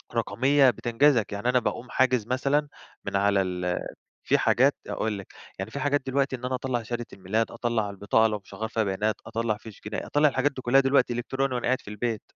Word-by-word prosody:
رقمية 130 +5 +3
بتنجزك، 120 -1 +2
يعني 100 +5 -1
أنا 125 0 +4
باقوم 125 +2 -4
حاجز 125 -4 +2
مثلًا 140 +3 +1 0.4
من - - -3
على 100 0 +3
ال 90 -1 -2 0.5
في - - +3
حاجات - - +3
أقول 110 -2 -2
لِك، 100 - -11 0.3
يعني 95 +3 -4
في 140 - -5
حاجات 145 0 +1
دلوقتي 135 0 0
إن 125 - -13
أنا 130 0 -1
أطلَّع 125 -2 -2
شهادة 120 +1 -4
الميلاد، 105 +4 -1
أطلَّع 115 -4 -1
البطاقة 100 +3 +2
لو 105 -1 -1
مش - - -13
هاغيَّر 110 0 -3
فيها 110 0 0
بيانات، 105 +3 0
أطلَّع 115 -1 -1
فيش 110 -1 -13
جنائي، 105 0 -4
أطلَّع 150 +1 +3
الحاجات 140 +2 +1
دي 130 - -8
كلها 135 +3 +5
دلوقتي 135 -2 +3
إلكتروني 130 +2 -1
وأنا 125 - -2
قاعد 130 +1 +2
في - - -14
البيت، 110 +1 -3
120 Hz, 210 wpm, -26 LUFS, 105-130 Hz, 0.5 s, كلها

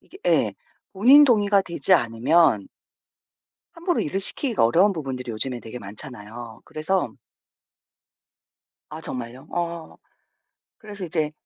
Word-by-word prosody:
이게 - - -16
예. - - +2 0.4
본인 255 +9 +7
동의가 205 -6 +3
되지 180 +1 +2
않으면 120 - +3 1.1
함부로 345 +1 -1
일을 190 +6 -2
시키기가 230 - +1
어려운 185 - +4
부분들이 130 -6 -5
요즘에 120 +2 -3
되게 115 +2 -9
많잖아요. 110 +1 -8
그래서 160 +5 -2 1.8
아 155 +1 -8
정말요? 125 0 -7
어. 170 -1 -4 0.8
그래서 205 -4 -9
이제 155 -2 -1
155 Hz, 265 characters per minute, -23 LUFS, 120-195 Hz, 1.8 s, 본인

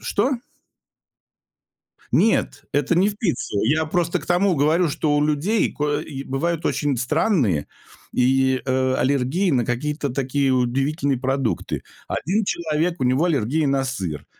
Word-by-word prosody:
Что? 250 +7 0 1.8
Нет, 225 - +1
это 145 +4 +1
не 190 +4 +4
в 205 - -5
пицце. 175 - -2
Я 155 +5 +2
просто 170 +1 0
к - - -12
тому 180 +2 +2
говорю, 160 +4 +2
что 145 0 0
у 145 - +2
людей 155 +9 +1
кое 150 0 -1 0.2
бывают 165 +4 -1
очень 145 -3 0
странные 125 - +1 0.5
и, 130 +1 +2
э, 130 0 +1
аллергии 140 +8 +1
на 125 -5 +2
какие-то 140 +4 -2
такие 135 +1 0
удивительные 135 +3 0
продукты. 135 -2 -2 0.3
1 205 +5 0
человек- 165 0 -1
у - - +1
него 130 +6 +2
аллергия 150 -1 +1
на 135 -1 +1
сыр. 95 - -4
145 Hz, 140 wpm, -22 LUFS, 130-170 Hz, 1.8 s, не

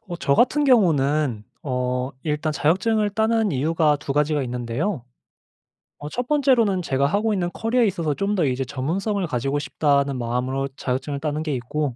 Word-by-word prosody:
어 175 - -4
저 140 - +2
같은 290 - +3
경우는 150 - +2 0.2
어 125 -1 -2
일단 155 0 -1
자격증을 205 +8 +1
따는 220 0 +1
이유가 150 +2 +2
2 140 0 -4
가지가 150 0 +1
있는데요. 125 - -3 1.0
어 145 - -6
1 245 +8 -4
번째로는 250 -10 +3
제가 140 -4 0
하고 210 +8 +1
있는 180 -3 -1
커리어에 230 +1 +1
있어서 170 -6 -1
'좀 200 +7 -1
더 175 -5 +2
이제 130 -1 0
전문성을 185 - -2
가지고 135 +2 -1
싶다.'는 140 0 +1
마음으로 125 +3 -2
자격증을 135 +2 -3
따는 150 +1 -2
게 155 -2 -2
있고. 130 +2 -3
150 Hz, 355 characters per minute, -23 LUFS, 135-200 Hz, 1.0 s, 같은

